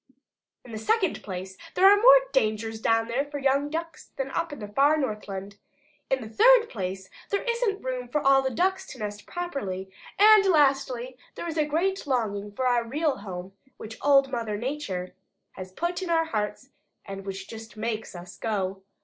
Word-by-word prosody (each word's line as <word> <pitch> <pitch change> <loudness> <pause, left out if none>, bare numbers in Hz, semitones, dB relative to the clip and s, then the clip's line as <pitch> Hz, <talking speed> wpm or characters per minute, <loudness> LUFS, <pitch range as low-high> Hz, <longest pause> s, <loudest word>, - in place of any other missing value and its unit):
In 245 - -11
the 220 - -5
second 410 - +1
place 190 0 -7 0.2
there 375 - +4
are 400 - +8
more - - +8
dangers 220 -2 0
down 225 0 +2
there 245 +4 0
for 290 0 -7
young 280 +1 +1
Ducks 330 +2 -6
than 270 0 -3
up 335 +2 -2
in 290 - -7
the 210 - -7
far 280 +8 +3
Northland. 205 -6 -4 0.5
In 265 -1 +1
the - - -7
third 460 - +5
place 190 -2 -4 0.2
there 400 - -1
isn't 470 -4 0
room 255 -1 -3
for 300 +5 0
all 275 -1 +5
the 265 - -1
Ducks 380 +8 0
to - - -10
nest 210 -2 -6
properly. 200 - -4 0.3
And 425 0 +7
lastly 270 -6 +2 0.2
there - - -5
is 325 - -4
a 305 - +3
great 340 +4 -1
longing 210 -6 -1
for 255 +6 -3
our 245 -1 +3
real 290 +5 -1
home, 190 -2 -7 0.2
which 220 +1 -9
Old 275 -1 +4
Mother 225 -3 -2
Nature 210 -8 -4 0.4
has 185 0 -9
put 345 - -3
in 370 - -4
our 325 -1 +2
hearts 215 +1 -4 0.3
and 195 0 -7
which 195 0 -6
just 225 0 -10
MAKES 220 -2 -4
us 175 +1 -10
go. 195 -3 -2
255 Hz, 185 wpm, -26 LUFS, 210-310 Hz, 0.5 s, are